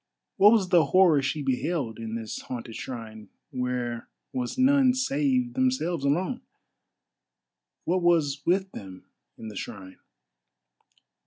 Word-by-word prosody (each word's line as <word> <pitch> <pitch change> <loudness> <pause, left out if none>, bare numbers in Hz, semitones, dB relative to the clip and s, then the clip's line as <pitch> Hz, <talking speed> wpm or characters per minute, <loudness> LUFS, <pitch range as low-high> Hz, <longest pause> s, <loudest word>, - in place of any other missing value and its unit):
What 205 +2 +7
was 200 -5 +2
the 175 -3 +5
horror 180 -6 +4
she 145 +2 -2
beheld 130 -2 -2
in 115 0 -5
this 110 -1 -5
haunted 120 -2 -7
shrine, 110 -4 -8 0.2
where 125 -2 -3 0.2
was 125 -1 -3
none 260 -1 +4
save 260 -1 0
themselves 255 - 0
alone? 180 - 0 1.4
What 185 +2 +1
was 155 -5 +2
with 190 +2 +1
them 95 -2 -10 0.3
in 110 - -8
the 105 - -10
shrine? 95 -1 -8
150 Hz, 120 wpm, -26 LUFS, 120-195 Hz, 1.4 s, What